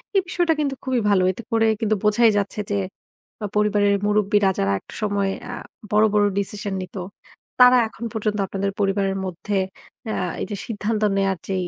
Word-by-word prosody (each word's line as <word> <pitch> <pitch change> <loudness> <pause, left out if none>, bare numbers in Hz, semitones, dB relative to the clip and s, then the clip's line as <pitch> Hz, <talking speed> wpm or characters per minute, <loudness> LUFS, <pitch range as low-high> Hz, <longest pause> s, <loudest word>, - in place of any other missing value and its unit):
এই 390 - +5
বিষয়টা 345 -2 +1
কিন্তু 280 -2 0
খুবই 260 -2 0
ভালো। 195 -2 +4
এতে 210 - -8
করে 225 0 +3 0.2
কিন্তু 215 -1 +2
বোঝাই 220 +2 +5
যাচ্ছে 205 +1 -2
যে, - - +1 0.7
আ - - 0
পরিবারের 205 -1 +3
মুরুব্বিরা 205 -1 +3
যারা 100 0 +1
একটা - - -15
সময় 200 -1 +1 0.2
আ - - -5 0.4
বড়, 210 +1 +5
বড় 205 -1 +4
ডিসিশন 200 0 -4
নিত। 185 +2 -9 0.6
তারা 250 0 +8
এখন 230 - -11
পর্যন্ত 215 -1 -1
আপনাদের 195 +1 -2
পরিবারের 195 -1 +1
মধ্যে 190 +3 -3 0.5
আ - - -1 0.3
এই - - -1
যে - - -1
সিদ্ধান্ত 215 0 -2 0.2
নেয়ার 195 -2 +1
যে 195 - -1
205 Hz, 175 wpm, -22 LUFS, 195-220 Hz, 0.7 s, তারা